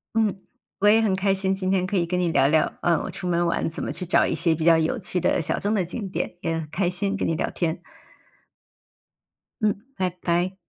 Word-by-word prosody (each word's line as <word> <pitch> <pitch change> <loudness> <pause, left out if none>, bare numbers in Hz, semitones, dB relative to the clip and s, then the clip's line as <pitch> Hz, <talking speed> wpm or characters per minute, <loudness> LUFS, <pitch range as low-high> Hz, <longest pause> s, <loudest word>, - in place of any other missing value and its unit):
嗯， 210 -4 +1 0.4
我 205 - +3
也 220 +2 +6
很 205 -4 +2
开 195 0 +1
心， 190 0 0
今 190 -1 -2
天 190 -1 +2
可 190 - -3
以 175 -2 +2
跟 180 +1 -1
你 175 -1 +1
聊 135 -4 +3
聊， 155 +1 +1
呃， 170 -2 +3
我 - - -5
出 180 - -6
门 175 0 +1
玩 170 - 0
怎 165 - -5
么 - - -3
去 180 - -4
找 - - +4
一 - - -1
些 165 -2 +2
比 160 0 -3
较 170 -1 +7
有 160 +10 0
趣 185 -4 -2
的 - - +1
小 155 - -1
众 205 +2 0
的 190 -4 +1
景 195 +3 -5
点， 185 - -4
也 165 - -1
很 160 - -6
开 180 0 0
心 195 +3 0
跟 200 - -1
你 165 - 0
聊 - - -1
天。 170 -1 -2 1.8
嗯， 210 -2 +1
拜 185 -1 0
拜。 175 +2 0
180 Hz, 260 characters per minute, -24 LUFS, 170-195 Hz, 1.8 s, 较